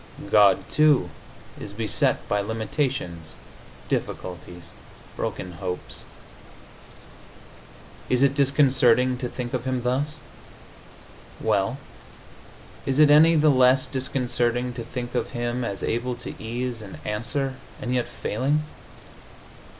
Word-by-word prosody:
God, 100 -2 +5
too, 145 - +4 0.5
is 100 - -8
beset 110 -1 0
by 105 0 +1
limitations, 110 - -3 0.5
difficulties, 90 -1 -5 0.4
broken 90 - -4
hopes. 90 0 -6 2.0
Is 125 +1 +3
it 140 -1 +4
disconcerting 130 -3 +4
to 125 - -3
think 120 -1 -6
of 125 -1 -2
Him 130 -2 -1
thus? 135 +5 -1 1.2
Well, - - 0 1.1
is 135 0 0
it 150 -1 +6
any 160 +3 +7
the 155 -1 +5
less 130 0 +4
disconcerting 125 -2 0
to 115 - -6
think 120 +1 -6
of - - -1
Him 120 +1 -2
as 100 -5 -4
able 120 +2 -1
to - - -8
ease 120 +1 -4
and 100 -6 -9
answer, 130 +6 -2 0.3
and 125 - -3
yet 125 -1 0
failing?... 140 +8 -1
125 Hz, 110 wpm, -24 LUFS, 110-135 Hz, 2.0 s, any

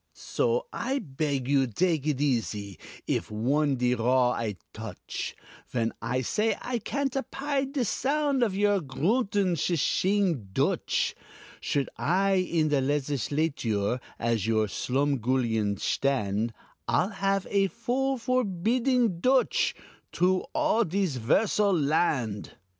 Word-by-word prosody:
"So 475 +1 0
I 270 +1 -1
beg 140 - -2
you 135 -1 +3
dake 155 - 0
it 145 -4 0
easy 110 - -1 0.3
If - - -2
on 135 +7 +1
de 125 0 +1
raw 125 +1 +3
I 110 -4 -2 0.2
touch, - - -6 0.4
Vhen 115 -2 0
I 125 +1 -1
say 215 - 0
I 245 -1 -3
can't 275 +4 -2
apide 275 0 -2
de 265 -5 0
sound 280 +3 0
Of 215 -5 +1
your 205 -1 +3
groontin, 190 - +1
shi 170 +3 0
shing 175 - +1
Dutch. - - +1 0.5
Should 140 -1 -1
I 195 +5 +2
in 170 -4 +1
the 145 - +2
Legisladure 135 -5 0 0.2
As 115 -3 0
your 110 -1 +2
slumgullion 125 -3 0
shtand, 110 -4 0 0.4
I'll 120 +11 +2
have 195 -1 0
a 195 -1 +3
bill 255 +5 -1
forbidding 235 -2 +1
Dutch 255 +6 +2 0.4
Troo 185 +1 +1
all 305 -7 +2
dis 180 - -1
'versal 195 - +2
land. 140 -8 0
160 Hz, 125 wpm, -27 LUFS, 125-210 Hz, 0.5 s, you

